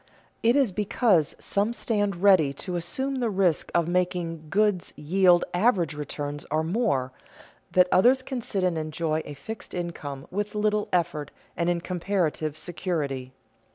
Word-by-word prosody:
It 235 +2 +4
is 270 -7 +3
because 200 - +2
some 205 +4 0
stand 205 -6 -1
ready 180 -9 +5
to 180 +6 -5
assume 265 +11 -2
the 240 -2 +1
risk 185 -6 +1
of 170 -1 +3
making 175 -3 -1
goods 205 -2 +1
yield 175 +3 +3
average 180 -5 +2
returns 145 0 -5
or 155 +2 +1
more, 160 - 0 0.6
that 180 0 +5
others 250 +8 +5
can 260 -2 -4
sit 195 -4 -2
and 175 -3 +1
enjoy 155 0 -1
a 145 - -8
fixed 220 +11 -8
income 150 -6 -5
with 205 +2 -3
little 210 0 +1
effort 165 -5 0 0.3
and 170 0 0
in 175 -1 0
comparative 170 -4 -1
security. 155 -7 -3
175 Hz, 150 wpm, -26 LUFS, 155-205 Hz, 0.6 s, ready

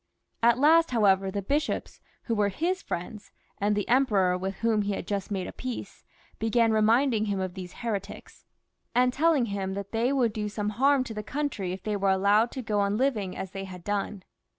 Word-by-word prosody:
At 235 0 +5
last, 320 +4 +5
however, 195 -5 +3
the 200 +1 -3
bishops, 290 +9 -2 0.2
who 230 - -2
were 210 -2 +2
his 350 - -1
friends, 200 +4 -6 0.3
and 205 +1 +1
the 205 - -1
Emperor, 210 -8 +3
with 190 +2 -3
whom 225 -1 +1
he 205 0 -1
had 195 - -4
just 200 -1 -3
made 190 -3 -2
a - - -6
peace, 255 -2 -7 0.4
began 225 0 +2
^ - - +1
reminding 220 +1 +3
him 200 -2 -1
of 185 -1 -3
these 180 -2 -8
heretics, 205 -4 -5 0.5
and 250 0 +3
telling 310 -4 +3
him 190 -1 -3
that 200 0 -6
they 230 +3 +1
would 245 -6 +1
do 210 -2 -3
some 210 0 -2
harm 270 +5 +3
to 235 - -7
the 210 - -4
coimtry 235 -6 -3
if 185 0 -6
they 210 -1 -1
were 200 -1 +1
allowed 200 +4 +3
to 260 - -5
go 210 -2 0
on 200 +1 +1
living 220 -8 0
as 190 - -5
they 195 0 -5
had 180 -2 -10
done. 205 -1 -3
210 Hz, 210 wpm, -27 LUFS, 195-245 Hz, 0.5 s, At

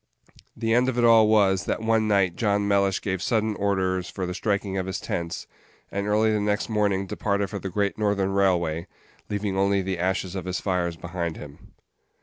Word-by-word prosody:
The 115 0 0
end 125 +2 +3
of 125 - -3
it 120 - +2
all 115 -2 +6
was, 100 -3 +3
that - - -1
one 110 -1 +2
night 95 -4 +2
John 100 -3 +1
Mellish 100 -1 +2
gave 95 -2 -2
sudden 110 -1 0
orders 95 -2 0
for 95 - -4
the 90 - -4
striking 100 0 -1
of 95 -1 -2
his 95 -2 -3
tents, 85 -1 -4 0.5
and 100 +1 -2
early 110 +1 +3
the 105 - +1
next 105 +2 -1
morning 100 -3 +1
departed 100 0 -1
for 100 - -4
the 95 - -5
Great 100 +2 -1
Northern 100 -2 +1
Railway, 85 -4 +1 0.4
leaving 105 -1 -2
only 100 0 +2
the 95 -1 -3
ashes 95 0 -1
of 95 -2 -5
his 90 -1 -2
fires 90 -3 -1
behind 85 -1 -4
him. 70 -1 -12
100 Hz, 195 wpm, -25 LUFS, 95-105 Hz, 0.5 s, all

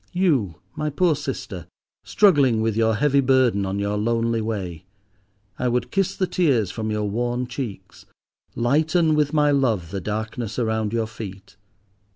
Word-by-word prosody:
You, 145 - +1 0.2
my 150 0 -2
poor 160 +2 +2
sister, 100 - -6 0.4
struggling 145 - +4
with 110 -1 0
your 110 -1 +2
heavy 140 +3 +3
burden 125 -7 +2
on 95 +1 -2
your 100 +1 -1
lonely 115 +1 0
way, 95 -7 -4 0.8
I 125 - 0
would 125 0 -1
kiss 195 -2 0
the 190 - 0
tears 140 - +1
from 110 +1 -4
your 105 -1 -1
worn 120 +4 -1
cheeks, 115 -7 -7 0.5
lighten 155 +6 +2
with 150 -1 +2
my 150 -1 +3
love 115 - +1
the 100 -1 -3
darkness 110 +2 -4
around 110 -3 0
your 115 -1 0
feet. 100 -3 -9
115 Hz, 155 wpm, -23 LUFS, 105-140 Hz, 0.8 s, struggling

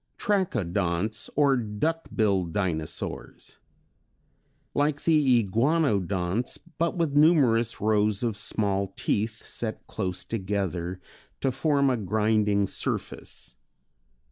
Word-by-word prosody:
Trachodonts 105 - 0
or 140 -2 +4
Duck 125 +9 -2
billed 95 -7 +1
Dinosaurs. 85 -6 -3 1.1
Like 145 0 0
the 140 -8 +4
Iguanodonts 105 - +1 0.2
but 170 +1 0
with 160 -4 0
numerous 135 -8 +4
rows 105 0 +2
of 115 -3 0
small 100 -2 -1
teeth 110 +2 -1
set 110 -2 -3
close 90 -3 -4
together 95 -4 -2 0.4
to 135 - +2
form 140 -1 +2
a 125 - +1
grinding 105 0 +2
surface. - - -3
110 Hz, 95 wpm, -27 LUFS, 100-140 Hz, 1.1 s, or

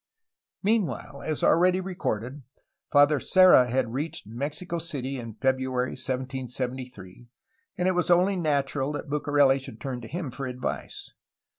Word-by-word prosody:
Meanwhile, 210 -3 -1
as 155 -2 -1
already 180 +2 +4
recorded. 145 - -3 0.5
Father 145 0 +5
Serra 185 -9 +6
had 120 -2 0
reached 145 0 -3
Mexico 145 - -4
City 140 -5 -3
in 115 -3 -8
February 130 0 0
1773, 125 -4 -5 0.5
and 180 0 +1
it - - +4
was 180 0 0
only 180 +3 +4
natural 145 -4 0
that 145 0 -6
Bucareli 145 -2 +3
should 115 -4 -10
turn 130 -3 -5
to 115 - -8
him 165 -3 -4
for 135 +2 -5
advice. 125 0 -5
135 Hz, 135 wpm, -26 LUFS, 125-165 Hz, 0.5 s, Serra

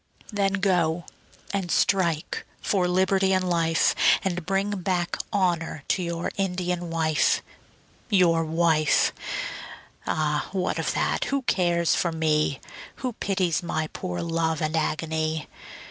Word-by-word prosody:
Then 200 -1 +1
go 175 -4 +1 0.5
and 195 -3 -1
strike 170 -6 +1 0.2
for 185 -3 +1
liberty 190 +1 +2
and 185 -1 +1
life, 165 -2 +2 0.3
And 180 -3 -2
bring 195 +2 0
back 175 -1 0 0.2
honour 175 -7 0
to 190 - +2
your 170 -1 -3
Indian 180 -2 -1
wife. 160 -2 +2 0.7
Your 175 -5 +4
wife? 160 -2 +2 0.9
Ah, 150 -2 0
what 185 -2 -1
of - - -1
that, - - 0
who 275 -1 -1
cares 175 -6 +2
for 170 - +1
me? 155 -3 +1 0.5
Who 250 - -1
pities 185 -5 0
my 160 -2 -2
poor 90 0 -4
love 165 -1 0
and 155 +1 -1
agony? 160 0 -1
170 Hz, 125 wpm, -25 LUFS, 160-185 Hz, 0.9 s, Your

